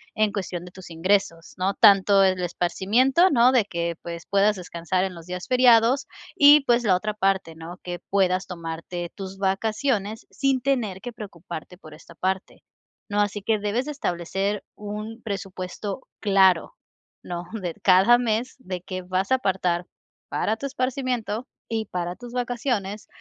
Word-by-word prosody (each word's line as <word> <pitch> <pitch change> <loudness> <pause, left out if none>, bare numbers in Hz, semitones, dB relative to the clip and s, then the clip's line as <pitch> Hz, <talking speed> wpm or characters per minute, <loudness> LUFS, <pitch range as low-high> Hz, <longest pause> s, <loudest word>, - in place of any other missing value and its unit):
en 215 -1 +2
cuestión 185 -3 -4
de 180 - -11
tus 185 -1 -12
ingresos, 170 0 0
¿no?, 185 +2 0
tanto 200 -2 +6
el 185 -1 +2
esparcimiento, 215 - +2
¿no?, 250 -4 +5
de 245 -5 +3
que, 170 -3 -3
pues, 170 -1 -7
puedas 200 +1 +3
descansar 180 0 -2
en 190 -1 -2
los 165 -1 -11
días 180 0 -6
feriados 250 +1 +5 0.3
y, 290 +1 +8
pues, 240 -3 +2
la 190 -3 +4
otra 215 +4 -2
parte, 195 -4 0
¿no?, 165 +2 -8
que 175 -1 -5
puedas 190 -1 +1
tomarte 170 0 -6
tus 195 -1 -7
vacaciones 215 +3 -1
sin 270 -2 0
tener 235 -8 -1
que 245 - -6
preocuparte 180 -6 -9
por 155 -4 -13
esta 165 +2 -15
parte, 190 +2 -3 0.5
¿no?, 205 0 0
así 205 0 0
que 215 +1 +1
debes 210 +4 -1
de 300 - -5
establecer 195 - -2
un 210 +2 -7
presupuesto 195 +1 -5
claro, 190 -4 +3 0.5
¿no?, 175 0 -5
de 190 -7 -4
cada 190 +6 +6
mes 240 +1 -1
de 185 -6 -5
que 185 +1 -5
vas 185 +3 -2
a - - +7
apartar 185 -7 0 0.4
para 220 - 0
tu 250 - -7
esparcimiento 255 -4 -2 0.3
y 220 -1 -1
para 180 -2 -4
tus 245 +2 -10
vacaciones 240 -5 -2
195 Hz, 160 wpm, -24 LUFS, 180-230 Hz, 0.5 s, y